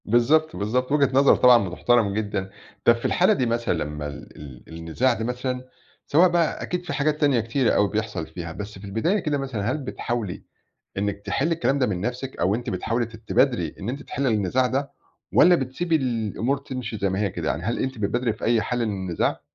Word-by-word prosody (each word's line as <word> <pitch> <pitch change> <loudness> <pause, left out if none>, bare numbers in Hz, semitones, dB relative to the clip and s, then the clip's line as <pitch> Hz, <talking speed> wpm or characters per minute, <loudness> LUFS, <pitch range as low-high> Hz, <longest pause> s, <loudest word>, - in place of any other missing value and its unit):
بالضبط، 150 +8 +3
بالضبط، 125 +6 -1
وجهة 145 -2 +3
نظر 135 +1 +6
طبعًا 120 -6 +5
بتحترم 110 +3 +2
جدًا، 100 -2 -2 0.4
طب 120 - +7
في 115 - -8
الحالة 185 +4 +4
دي 130 - 0
مثلًا 115 -2 0
لمّا 75 0 -5
ال 75 0 -10
ال 65 -4 -12
النزاع 85 +11 +1
ده 110 -1 -4
مثلًا، 125 +1 -3 0.4
سواء 175 +5 +5
بقى 170 -2 0
أكيد 180 0 -3
في - - -4
حاجات 150 +1 0
تانية 140 -5 +4
كتيرة 115 +3 +1
أوي 105 - +3
بيحصل 105 -6 -3
فيها، 85 0 -7
بس 100 +3 -8
في 100 - -10
البداية 115 - 0
كده 150 -5 -1
مثلًا، 125 -5 -2
هل 150 - -1
بتحاولي 120 -7 -4 0.5
إنِّك 100 0 -2
تحلّي 160 +5 0
الكلام 140 -4 0
ده 130 - +3
من 90 -4 -2
نفْسِك، 125 +4 -4
أو 95 +3 +2
أنتِ 120 +1 -4
بتحاولي 115 +6 -1
ت 115 0 -12
تبادري 110 0 +1
إن 100 - -4
أنتِ 140 +3 -5
تحلّي 140 0 -2
النزاع 110 +4 +1
ده، 135 +2 -2 0.4
والّا 180 +1 +7
بتسيبي 160 +4 -1
الأمور 120 -1 -1
تمشي 130 -5 -6
زي 100 -1 0
ما 95 +1 -2
هي 105 -1 +1
كده، - - -3
يعني 80 - -2
هل 115 +5 -1
أنتِ 130 -1 -2
بتبادري 115 +3 0
في 110 - -6
أي 115 -1 +3
حل 120 +2 -1
من 105 - -2 0.2
النزاع؟ 85 - -1
120 Hz, 210 wpm, -24 LUFS, 105-135 Hz, 0.5 s, طب